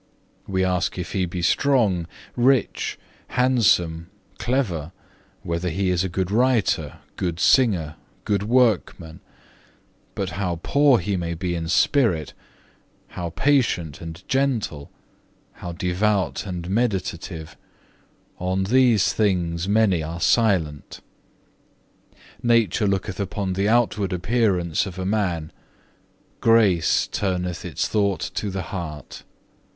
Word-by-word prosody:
We 95 -1 0
ask 90 -1 -1
if 90 - -5
he 95 -2 0
be 85 0 -5
strong, 105 - +2 0.3
rich, 125 0 +1 0.3
handsome, 100 -10 +2 0.3
clever, 95 - -1 0.5
whether 85 +1 -2
he 95 +2 0
is 90 0 +1
a 95 - -2
good 95 +1 -2
writer, 120 -1 +1 0.2
good 85 -2 -2
singer, 90 - +3 0.3
good 100 -2 +1
workman; 105 -8 +1 1.0
but 95 -3 -3
how 90 -3 -2
poor 140 -3 +4
he 95 +1 -2
may 85 -1 -3
be 90 +1 -3
in 85 -1 -3
spirit, 90 - +2 0.8
how 85 -1 -5
patient 105 - 0
and 80 +2 -9
gentle, 120 - -1 0.6
how 85 - -8
devout 95 +3 -1
and 90 -2 -5
meditative, 95 -6 -2 0.8
on 95 +1 -1
these 120 -1 +3
things 90 -4 0
many 100 -5 +3
are 80 +2 -5
silent. 85 -9 +1 1.4
Nature 115 -3 +2
looketh 95 -1 -2
upon 100 -1 -2
the 100 +3 0
outward 105 -5 +1
appearance 90 -4 0
of 90 -1 -8
a 95 - -3
man, 90 -6 -1 0.9
grace 110 -7 +3
turneth 90 -3 -2
its - - -2
thought 100 -3 0
to 105 - -2
the 95 0 -4
heart. 85 -4 -7
95 Hz, 115 wpm, -23 LUFS, 85-110 Hz, 1.4 s, poor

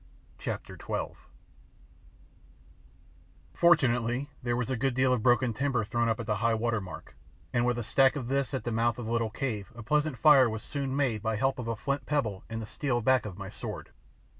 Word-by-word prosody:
CHAPTER - - -5
XII - - -3 2.4
Fortunately 130 -5 +3
there 120 -1 0
was 125 +1 -2
a - - +1
good 130 +1 0
deal 130 0 +3
of 125 - 0
broken 120 0 +3
timber 130 -1 0
thrown 120 +2 0
up 115 - 0
at 115 - -5
"high 115 +1 +1
water" 115 -1 0
mark, 95 - -10 0.4
and 120 0 +2
with 120 -1 +1
a 120 - -2
stack 130 +5 +4
of 130 -5 -4
this 135 +1 0
at 130 - -3
the 120 - -2
mouth 115 0 +1
of 120 - -5
the 115 - -4
little 115 -1 +1
cave 110 -5 -4
a 120 - -8
pleasant 150 +2 +1
fire 140 -5 +6
was 110 -1 -5
soon 140 -2 -3
made 130 -7 0
by 110 +1 -1
help 135 +3 0
of 120 - -4
a 115 - -1
flint 140 +5 -3
pebble 115 -10 -1
and 115 0 -4
the 110 - -5
steel 125 +2 -1
back 130 0 +2
of 95 -3 -8
my 100 -1 -6
sword. - - -7
120 Hz, 205 wpm, -29 LUFS, 115-135 Hz, 2.4 s, fire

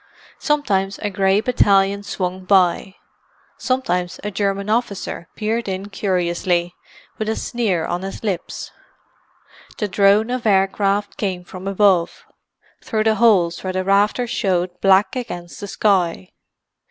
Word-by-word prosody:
Sometimes 200 -10 0
a 205 - -3
grey 195 +1 +2
battalion 200 -4 +3
swung 185 -2 -4
by; 190 0 +2 0.6
sometimes 180 -9 -1
a 210 - -3
German 200 0 -1
officer 210 -6 -2
peered 225 +1 -2
in 190 +2 -4
curiously, 175 -2 -1 0.5
with 215 0 -2
a 220 - 0
sneer 200 -9 -1
on 175 +1 -3
his 195 +3 -7
lips. 195 -5 -4 1.1
The 210 - -1
drone 205 +4 +3
of 250 -2 -2
aircraft 200 +1 +1
came 185 -4 -3
from 185 +2 -9
above, 195 -3 +2 0.6
through 215 -1 -1
the 220 0 +3
holes 180 -8 +3
where 185 -1 -3
the 185 0 -1
rafters 205 +5 +2
showed 185 -5 0
black 195 +5 +4
against 175 -9 -6
the 205 - -6
sky. 180 - 0
195 Hz, 130 wpm, -20 LUFS, 185-210 Hz, 1.1 s, black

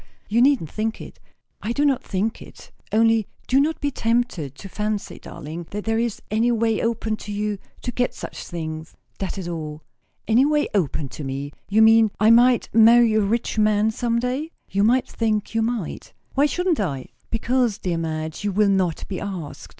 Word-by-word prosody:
You 230 +3 +2
needn't 255 - +3
think 220 +1 -2
it." - - -11 0.4
"I 225 +3 -2
do 285 +3 +1
not 275 -3 +2
think 205 +4 -2
it. - - -13 0.2
Only, 225 -1 +3 0.2
do 265 - +3
not 315 +3 0
be 285 -1 -1
tempted 225 - -1
to 195 - -10
fancy, 210 +1 -3
darling, 160 +3 -8
that 210 0 -5
there 225 0 +1
is 235 -2 -2
any 225 +3 +2
way 225 -1 +1
open 225 -1 -1
to 210 - -8
you 205 -1 -2 0.2
to 245 - -2
get 250 0 -1
such - - -7
things; 160 -2 -6 0.2
that 195 0 -3
is 185 -3 -5
all." 155 -3 -5 0.4
"Any 230 +4 +5
way 295 +1 +2
open 155 -7 0
to 150 - -8
me? 135 +1 -4 0.2
You 220 +2 +5
mean, 225 0 +6
I 215 +1 +6
might 245 +1 +5
marry 230 +1 +6
a 215 - +3
rich 220 +2 -1
man 215 0 +3
some 235 +1 -1
day?" 255 +6 -2 0.2
"You 200 +1 +2
might 250 +4 +3
think 215 -2 -1
you 225 - +1
might." 225 -6 -3 0.2
"Why 280 +2 +3
shouldn't 355 +1 0
I?" 140 -10 -3 0.2
"Because, 240 -1 +1
dear 175 -3 -2
Madge, 160 0 -4
you 205 - 0
will 205 +1 +3
not 185 -4 0
be 185 - -4
asked. 185 -7 -6
215 Hz, 190 wpm, -23 LUFS, 190-235 Hz, 0.4 s, mean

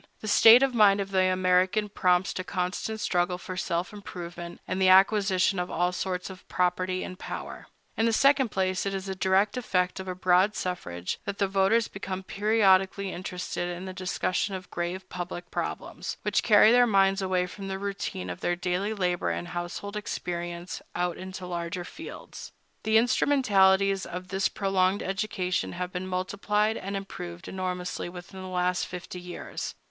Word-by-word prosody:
The 215 - -6
state 225 +4 +8
of 270 -2 +2
mind 205 -3 +5
of 195 0 -3
the 190 -1 +3
American 185 +3 +2
prompts 185 -2 +2
to 185 - -4
constant 185 +4 -3
struggle 180 -2 0
for 185 +1 -7
self 175 +1 -2
improvement 175 -4 -8
and 185 - -2
the 185 - +5
acquisition 195 0 +4
of 180 - -2
all 175 +1 +1
sorts 180 0 -3
of 185 - -13
property 185 +1 0
and 185 - -8
power. - - -7 0.3
In 225 - +2
the - - +3
second 270 +2 +4
place, 185 -1 0
it 195 - -2
is 195 0 -5
a 190 - -2
direct 190 +4 +2
effect 180 -6 0
of 190 - -6
a 185 - -3
broad 185 +3 +3
suffrage 90 - -4
that 200 0 -4
the 200 - +2
voters 195 +4 +3
become 190 -1 -5
periodically 195 -2 +2
interested 180 -1 -4
in 175 +1 -5
the 185 - -6
discussion 185 +1 -1
of 185 0 -9
grave 180 +2 -3
public 175 0 -6
problems, - - -4
which - - +2
carry 215 -1 +6
their 245 0 +6
minds 195 -2 +3
away 185 -1 +1
from 195 +2 -8
the 190 0 -3
routine 195 - -4
of 90 - -7
their 175 - 0
daily 185 +4 -1
labor 180 -3 0
and 175 - -3
household 175 +4 -5
experience 175 -4 -4
out 175 0 0
into 185 0 -7
larger 175 0 -4
fields. 320 - -9 0.3
The 220 0 +3
instrumentalities 195 -6 +3
of 180 +1 -7
this 190 +1 +1
prolonged 195 -1 +1
education 195 -2 -2
have 180 +1 -4
been 185 +1 -4
multiplied 200 +4 0
and 195 0 -4
improved 175 -3 -7
enormously 180 -2 -3
within 180 +2 -10
the 185 - -7
last 180 0 0
fifty 180 0 -7
years. 180 0 -6
185 Hz, 175 wpm, -27 LUFS, 180-200 Hz, 0.3 s, state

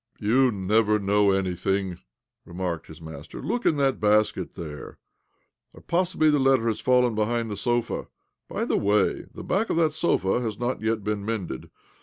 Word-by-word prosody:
" - - -35
You 125 +5 +3
never 105 +2 +2
know 100 0 +2
anything," 95 -1 -1 0.4
remarked 90 -3 -4
his 80 +1 -12
master. 80 -1 -9
"Look 245 - -1
in 155 - +3
that 135 -2 +1
basket 105 0 +1
there. 75 -3 -8 0.8
Or - - -14
possibly 170 -3 +2
the 145 - +3
letter 135 -3 +3
has 110 - -2
fallen 125 -2 +3
behind 115 +1 -1
the - - -3
sofa? 120 +4 -1 0.4
By - - -2
the - - +1
way, 105 -1 +1
the - - -9
back 210 +5 0
of - - 0
that 160 -2 +3
sofa 120 - +1
has 110 -4 -3
not 120 0 -2
yet 110 -1 -1
been 105 0 -2
mended. 100 - -4
105 Hz, 175 wpm, -25 LUFS, 95-125 Hz, 0.8 s, You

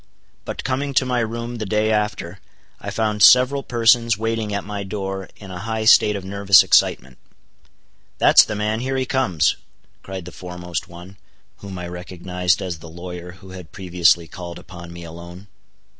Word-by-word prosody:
But - - -5
coming 135 +1 -2
to 130 - +3
my 125 -1 0
room 115 +1 -4
the 110 - -3
day 110 +1 +1
after, 105 -4 -2 0.4
I - - -6
found 105 -2 -1
several 130 +6 +6
persons 115 -2 +3
waiting 115 -1 -2
at 100 -1 -2
my 105 -1 -5
door 95 -1 -5
in 95 -2 -11
a 90 - -7
high 110 +1 -3
state 105 -1 +6
of 95 -2 -6
nervous 100 0 +5
excitement. - - +2 1.0
"That's - - +7
the 110 - -4
man—here 110 +6 -2
he 130 - 0
comes," 120 - +1 0.4
cried 95 -2 -7
the 90 - -9
foremost 90 0 -6
one, 90 +2 -13 0.4
whom 100 -2 -9
I 90 0 -6
recognized 90 +1 -2
as 90 -4 -5
the 80 - -11
lawyer 90 +1 -8
who 95 0 -14
had 90 -4 -11
previously 85 -3 +2
called 85 -1 -8
upon 85 -2 -11
me 85 0 -9
alone. 85 +3 -11
95 Hz, 170 wpm, -21 LUFS, 90-110 Hz, 1.0 s, That's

